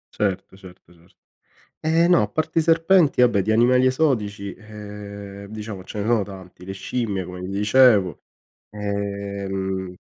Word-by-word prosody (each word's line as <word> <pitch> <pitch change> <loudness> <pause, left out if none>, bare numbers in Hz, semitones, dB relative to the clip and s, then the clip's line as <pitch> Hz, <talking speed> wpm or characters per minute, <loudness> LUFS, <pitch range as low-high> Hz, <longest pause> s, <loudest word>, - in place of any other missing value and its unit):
Certo, 95 -2 -2
certo, 90 -2 -16
certo. 85 +2 -25 0.7
Ehm, 165 +2 +3
no, 175 - +5
a 105 - -1
parte 160 +6 0
i - - +1
serpenti 165 -3 +4
vabbè 115 -6 +4
di 110 - -2
animali 125 +3 +4
esotici 105 - 0
ehm 100 -2 -9
diciamo 105 -3 -7
ce 105 - -8
ne 105 - -2
sono 115 -3 +3
tanti, 95 -2 -11
le 95 - -6
scimmie 100 -2 -3
come 90 +1 -8
ti 90 - -5
dicevo. 105 - +4 0.5
Ehm 100 -2 -4
100 Hz, 150 wpm, -23 LUFS, 95-120 Hz, 0.7 s, no